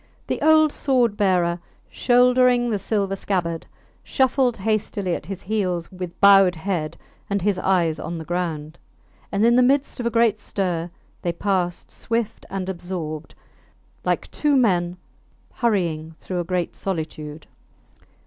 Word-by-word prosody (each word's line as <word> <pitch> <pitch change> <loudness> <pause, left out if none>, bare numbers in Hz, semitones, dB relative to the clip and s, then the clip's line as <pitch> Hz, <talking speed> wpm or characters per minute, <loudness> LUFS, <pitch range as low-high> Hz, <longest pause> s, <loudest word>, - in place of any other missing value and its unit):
The - - -3
old 310 -1 +5
sword 250 -8 +1
bearer, 180 -4 +2 0.3
shouldering 245 -1 +3
the 210 - 0
silver 195 -1 -1
scabbard, 175 -4 -2 0.4
shuffled 260 -2 +1
hastily 205 -2 -1
at 155 - -5
his 195 -1 -6
heels 185 -5 -2
with 180 -2 -7
bowed 195 -2 +7
head, 165 -2 -3 0.3
and 200 0 +1
his 195 0 0
eyes 175 -5 +1
on 170 +1 -5
the 160 - -7
ground. 165 -3 -3 0.5
And 205 +2 +2
in 235 +1 +5
the 250 - +6
midst 270 +2 +2
of 240 - -1
a - - +2
great 230 -2 +2
stir 180 -5 -2 0.3
they 175 - 0
passed 180 -1 -1
swift 230 -1 -3
and 190 -1 -4
absorbed, 175 -4 -5 0.7
like - - -1
two 295 -2 +1
men 180 -8 +2 0.6
hurrying 170 -9 -1
through 180 -1 -4
a - - 0
great 180 -1 -2
solitude. 155 -4 -5
190 Hz, 140 wpm, -23 LUFS, 175-230 Hz, 0.7 s, bowed